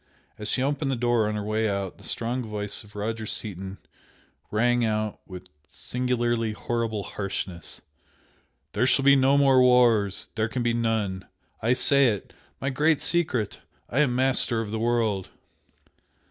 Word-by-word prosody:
As 105 - -4
she 130 - +1
opened 140 +1 -1
the 135 - +1
door 120 -3 +1
on 105 - -2
her 105 - -3
way 110 +1 0
out, 100 -2 -3
the - - -15
strong 120 +2 -2
voice 105 -3 -4
of 105 0 -18
Roger 110 +1 -3
Seaton 95 -2 -5 0.7
rang 120 +3 +2
out 110 -1 -1
with 90 -1 -9 0.2
singularly 120 0 -1
horrible 115 -2 -2
harshness 95 -5 -5 0.9
"There 120 +5 +2
shall 135 +2 +3
be 140 0 +8
no 135 +1 +4
more 135 -2 +5
wars! 120 -6 +4
There 110 -1 -1
can 125 +1 -2
be 120 0 +1
none! 110 -5 -1 0.3
I 115 +3 +3
say 140 +2 +5
it! 105 -5 -2 0.3
My 140 - -1
great 150 +3 +2
secret! 150 - 0 0.3
I 125 - +1
am 135 -5 +3
master 130 -2 +1
of 110 -2 -4
the 110 - -2
world!" 115 -5 0
115 Hz, 160 wpm, -26 LUFS, 105-125 Hz, 0.9 s, be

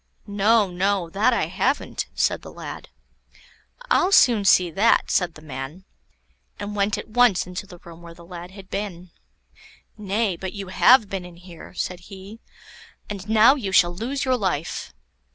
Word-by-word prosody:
"No, 205 0 +2
no; 185 -1 -1
that 210 +7 +2
I 235 - +1
haven't," 250 - -2
said - - 0
the - - -11
lad. - - -9 1.0
"I'll 370 - +3
soon 235 - +5
see 180 -3 +4
that," 215 +7 +2
said 180 -3 0
the 155 - -14
man, 140 +5 -7 0.8
and 205 0 -5
went 200 0 0
at - - -7
once 240 -4 +3
into 180 +2 -7
the 180 -3 -12
room 170 -1 -14
where 170 -1 -12
the 170 - -15
lad 175 0 -9
had 190 0 -14
been. 180 -4 -5 0.9
"Nay, 205 -1 -1
but 190 0 -6
you 200 -3 -7
have 225 +4 +5
been 195 -2 -5
in 180 -1 -12
here," 175 0 -13
said 180 0 -3
he; 195 +3 -11 0.7
"and 200 0 -7
now 220 +4 +6
you 230 -10 -4
shall 175 -2 +4
lose 255 +9 -3
your 260 -1 +2
life." 175 - -3
195 Hz, 170 wpm, -23 LUFS, 175-215 Hz, 1.0 s, now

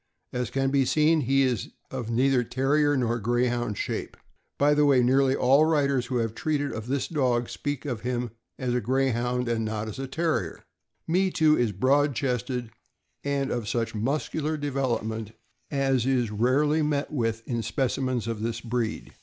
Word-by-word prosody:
As 125 -1 -2
can 135 0 0
be 140 -1 +3
seen, 155 +4 +3
he 135 +1 +3
is 125 -5 -1 0.2
of 125 -4 -4
neither 125 +2 +2
Terrier 145 +4 +1
nor 120 -2 0
Grey 120 +3 +1
hound 120 -4 -1
shape. - - -4 0.4
By 145 +1 +4
the 150 0 +3
way, 135 -4 +5
nearly 135 +2 +3
all 135 +2 +4
the 155 - +5
writers 140 -5 +1
who 125 - -1
have 115 -2 -1
treated 145 +2 -1
of 110 +1 -6
this 135 +1 -1
dog 125 -6 0
speak 145 0 -4
of 120 -6 -3
him 125 -1 -2 0.3
as 125 -2 -2
a 125 - +1
Greyhound 125 0 0
and 115 -1 0
not 110 0 -3
as 110 - -7
a 135 - -3
Terrier. 155 - -2 0.4
Me 185 +3 +2
Too 155 -3 +4
is 120 -6 +1
broad 135 +7 +2
chested 125 -2 -2 0.5
and 140 -1 -1
of 120 -3 -2
such 115 -1 -1
muscular 150 +6 -1
development 120 -6 -2 0.4
as 135 -3 +1
is 125 -5 +1
rarely 140 +8 +2
met 150 -1 -1
with 115 -4 -2
in 120 -2 -1
specimens 125 +2 -1
of 115 -2 -3
this 115 +1 -2
breed. 115 -1 -3
130 Hz, 180 wpm, -26 LUFS, 115-140 Hz, 0.5 s, way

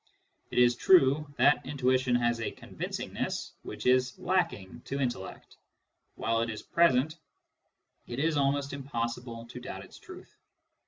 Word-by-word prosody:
It - - -6
is 120 0 +5
true 145 -1 +4
that 145 - +4
intuition 130 -2 +1
has 120 -1 +1
a - - -1
convincingness - - -4
which - - -8
is 125 0 +3
lacking 165 - -1
to 140 - -3
intellect: 120 -8 -4 0.6
while 115 0 0
it 115 - -1
is 110 -1 -6
present, 155 -2 +3 0.9
it 120 - -6
is 155 +3 +1
almost 140 0 +1
impossible 120 -3 -4
to 120 +1 -9
doubt 125 - -7
its - - -15
truth. - - -13
130 Hz, 140 wpm, -30 LUFS, 120-140 Hz, 0.9 s, is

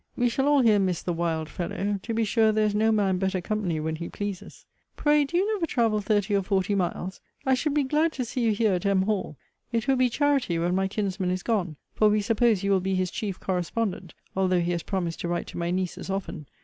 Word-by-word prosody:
We 245 -1 +2
shall 270 +4 0
all 290 -1 +5
here 220 -4 +5
miss 185 -3 0
the 175 - -1
wild 165 -2 -1
fellow. 195 +4 -3
To 230 - -4
be 225 - +2
sure, 220 0 +3
there 215 0 +2
is 210 - 0
no 220 +2 +3
man 195 -4 +2
better 190 0 0
company 180 -4 -2
when 160 +1 -2
he 170 +1 -5
pleases. 205 -3 -6 0.3
Pray, 295 -1 +3
do 345 +5 -2
you 405 +4 +1
never 365 -6 -1
travel 225 -6 +1
thirty 205 0 +1
or 200 - +3
forty 195 +1 0
miles? 185 -1 -2 0.2
I 265 - +3
should 285 +3 0
be 295 - +3
glad 305 +4 +1
to 255 - -3
see 245 +2 -3
you 230 -2 +3
here 210 -1 +2
at 180 - -1
M. 200 -2 +2
Hall. 195 -7 -2 0.3
It 230 0 -1
will 270 -1 +3
be 255 0 +3
charity 275 - +1
when 175 +2 0
my 190 +1 +1
kinsman 190 -2 -2
is 185 0 -2
gone; 190 -9 -1 0.2
for 215 - +4
we 210 0 +2
suppose 225 -2 +2
you 200 - +1
will 195 - +4
be 190 +1 -1
his 185 -1 0
chief 200 -4 -4
correspondent; 185 -1 -2 0.2
although 185 -1 +2
he 170 +1 0
has 170 -1 -1
promised 175 -3 -3
to - - -3
write 175 0 -2
to - - -7
my 170 0 -1
nieces 185 +1 -3
often. 190 -6 -4
200 Hz, 245 wpm, -26 LUFS, 180-230 Hz, 0.3 s, all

